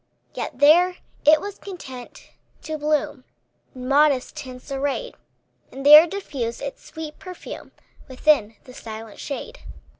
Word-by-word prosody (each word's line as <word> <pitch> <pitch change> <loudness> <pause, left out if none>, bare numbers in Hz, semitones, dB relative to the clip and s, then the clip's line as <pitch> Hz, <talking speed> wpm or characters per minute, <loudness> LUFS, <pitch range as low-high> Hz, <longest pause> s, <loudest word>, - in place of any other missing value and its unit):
Yet - - -5
there 345 +5 +5 0.3
it 305 +1 +7
was 405 +2 -7
content 265 -11 -10 0.3
to 315 - -4
bloom, 295 -2 -1 0.5
In 255 0 -7
modest 280 -1 +3
tints 260 -2 -9
arrayed; 280 - -2 0.6
And 270 +1 -8
there 300 +3 +10
diffused 280 -11 -5
its 280 - -6
sweet 315 -1 -9
perfume 365 -2 -9 0.4
Within 255 -5 +2
the 255 - -14
silent 220 -2 -9
shade. 470 - -6
290 Hz, 125 wpm, -23 LUFS, 255-315 Hz, 0.6 s, there